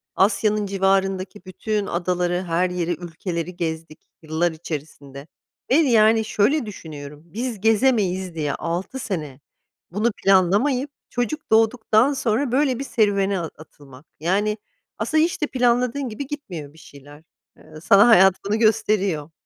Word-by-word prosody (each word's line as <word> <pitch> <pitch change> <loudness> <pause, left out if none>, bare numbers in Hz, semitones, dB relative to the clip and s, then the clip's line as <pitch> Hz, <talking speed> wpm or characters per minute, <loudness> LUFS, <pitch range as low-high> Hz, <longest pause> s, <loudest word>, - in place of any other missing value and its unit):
Asya'nın 210 +1 +2
civarındaki 195 0 -1
bütün 210 +3 -3
adaları 180 +1 -1
her 175 +1 0
yeri 175 -1 -2
ülkeleri 170 +1 -5
gezdik 160 -2 -4 0.2
yıllar 160 +2 0
içerisinde. 145 -3 -8 0.4
Ve - - +5
yani 225 -7 +4
şöyle 225 +6 +1
düşünüyorum 150 -6 -9
biz 220 +4 -5
gezemeyiz 210 -6 +1
diye 150 -3 -2
6 180 +10 -4
sene 150 - -5 0.5
bunu 215 +5 0
planlamayıp 205 +9 +3 0.2
çocuk 245 +5 -3
doğduktan 225 +3 +3
sonra 260 -1 0
böyle 260 -1 +1
bir 275 - -3
serüvene 200 -6 +1
a 165 -2 -4
atılmak. 145 -2 -16
Yani 200 +6 0 0.4
aslında 310 +9 +1
hiç 340 - -2
de - - +1
planladığın 250 +1 0
gibi 260 +6 -6
gitmiyor 175 - -7
bir - - -20
şeyler. 145 +1 -15 0.3
Eee, - - -19 0.2
sana 200 +3 +6
hayat 190 -5 +6
bunu 215 +2 0
gösteriyor. 195 -8 +1
195 Hz, 135 wpm, -22 LUFS, 170-225 Hz, 0.5 s, sana